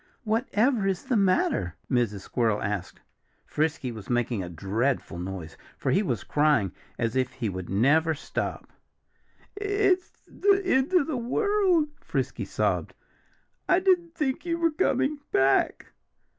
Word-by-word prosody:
"Whatever 225 0 +1
is 190 -1 -1
the 260 -2 0
matter?" 185 - +2
Mrs. 115 -6 0
Squirrel 110 -1 0
asked. 100 -3 -4 0.4
Frisky 150 -4 -1
was 110 -4 -10
making 120 -3 0
a 90 - -5
dreadful 100 - -1
noise, 90 -3 -6 0.2
for - - -1
he 190 - +3
was 125 - -2
crying 145 - +2 0.3
as 115 0 -1
if 130 -1 0
he 115 - -3
would 95 -2 -6
never 155 - +3
stop. 145 - -5 0.8
"It's 405 -2 0
the 400 0 +2
end 265 -3 +2
of 350 - +5
the 300 -4 -2
world!" 365 - +2
Frisky - - -3
sobbed. - - -1 0.7
"I 360 - +6
didn't 355 -3 +2
think 270 -5 -1
you 335 -1 -1
were 335 -1 +2
coming 295 -2 +1
back." 135 0 +2
160 Hz, 140 wpm, -27 LUFS, -, 0.8 s, I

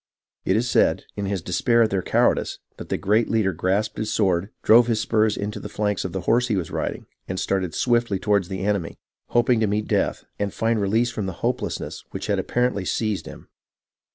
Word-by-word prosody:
It 95 - +2
is 115 +3 +1
said, - - +2
in 100 -1 -3
his 95 -3 -2
despair 115 +7 +3
at 110 - 0
their 95 -1 +1
cow - - +3
ardice, - - -4 0.2
that - - -9
the - - 0
great 110 +4 +2
leader 110 -4 +1
grasped 95 +6 -1
his 110 - -2
sword, 90 +1 +1
drove 115 +2 +6
his 115 -2 +1
spurs 110 0 +1
into 105 +1 -4
the 105 - -7
flanks 105 -1 -1
of 95 - -4
the 95 - -3
horse 120 +7 +2
he 110 - 0
was 90 -5 -3
riding, - - -3 0.2
and 95 0 -3
started 95 -3 -1
swiftly 120 -4 +1
toward 100 -1 +1
the 95 +1 -4
enemy, 100 -5 -1 0.3
hoping 120 0 +3
to 110 - +2
meet 105 +1 -1
death, - - 0 0.2
and 100 -1 -2
find 115 -1 +1
release 110 +5 +1
from 105 -4 -3
the 95 - -3
hopelessness - - -3
which - - -6
apparently 125 -4 0
had 95 - -6
seized 110 -3 -1
him. - - -11
105 Hz, 210 wpm, -23 LUFS, 95-115 Hz, 0.3 s, drove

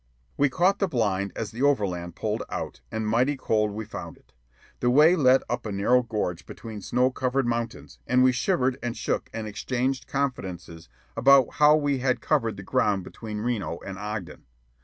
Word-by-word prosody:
We 145 0 +3
caught 185 +8 +2
the 195 - +2
blind 100 - 0
as 110 - -4
the 120 - -7
overland 95 -11 0
pulled 110 0 -2
out, - - -5
and 110 -1 -2
mighty 125 +6 +2
cold 105 -4 +1
we 110 +2 -5
found - - -8
it. - - -28 0.5
The 120 - +2
way 150 +7 +6
led 130 -5 +4
up 120 0 -3
a - - -4
narrow 105 +6 +3
gorge 105 -8 -3
between 110 -3 -8
snow 125 +6 +1
covered 130 +1 0
mountains, 120 -1 -4
and 125 0 +4
we 130 - +6
shivered 130 -1 0
and 120 -1 -4
shook - - -2
and 110 -1 -5
exchanged 130 +5 -2
confidences 90 - -4 0.3
about 135 +2 +5
how 150 0 +7
we 145 -3 0
had 130 -1 +1
covered 115 -1 0
the 100 - -8
ground 105 -4 +1
between 105 +2 -7
Reno 110 -7 -2
and 95 -1 -7
Ogden. 105 -3 -6
120 Hz, 180 wpm, -26 LUFS, 105-130 Hz, 0.5 s, how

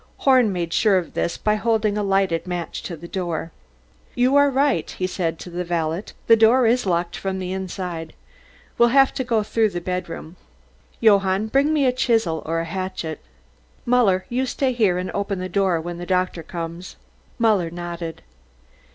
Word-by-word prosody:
Horn 255 -5 +4
made 170 -2 -3
sure 205 -4 +4
of 175 -3 -3
this 170 - -1
by 210 - +1
holding 215 -1 +1
a 210 - 0
lighted 195 -4 +1
match 175 -1 -4
to 170 - -6
the 170 +3 -10
door. 170 -3 -3 0.6
"You 255 +2 +3
are 285 0 +6
right," 275 +1 +1
he 185 - -3
said 170 -3 -2
to 180 - -9
the 175 +1 -3
valet, 170 +1 -2 0.2
"the 230 - +7
door 230 +3 +5
is 235 -1 +2
locked 170 -1 0
from 190 -1 -3
the 185 -1 -4
inside. 180 -3 -5 0.7
We'll 235 0 +6
have 270 +2 +4
to 260 - -2
go 230 -3 +1
through 220 +1 +1
the 175 - -4
bedroom. 175 -1 -5 0.6
Johann, 200 -2 +4
bring 275 +5 +3
me 300 -3 +2
a 250 - +3
chisel 225 -10 +1
or 165 +1 0
a - - -4
hatchet. 170 -3 -4 0.6
Muller, 225 -7 +3
you 255 +2 -1
stay 260 0 0
here 210 -7 +2
and 180 +1 -3
open 200 -1 -2
the 185 0 -4
door 185 -2 +1
when 170 +1 -6
the 175 - -7
doctor 185 -2 0
comes." 170 +2 -7 0.4
Muller 210 -7 +2
nodded. 170 -1 -6
190 Hz, 180 wpm, -22 LUFS, 175-225 Hz, 0.7 s, the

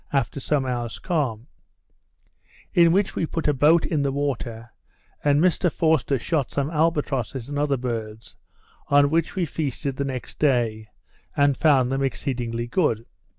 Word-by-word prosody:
after 140 +1 0
some 140 0 0
hours 120 -2 -3
calm; 130 - -2 1.3
in 170 -1 +5
which 195 +2 +1
we - - -1
put 165 0 -2
a 150 - +3
boat 150 +5 +4
in 155 -3 0
the 140 -1 0
water, 120 -5 -3 0.5
and 145 0 +3
Mr 175 0 +2
Forster 155 -3 +1
shot 140 +1 -1
some 140 +2 -2
albatrosses 145 -6 -1
and 145 0 -3
other 145 -2 +1
birds, 115 -3 -5 0.5
on 145 0 +4
which 165 +3 0
we 185 -2 0
feasted 140 -3 -3
the 140 - -1
next 130 -2 -6
day, 115 -6 +1 0.5
and 140 -1 +4
found 130 -4 +3
them 135 0 -1
exceedingly 120 -3 -2
good. 120 - 0
140 Hz, 150 wpm, -24 LUFS, 125-155 Hz, 1.3 s, in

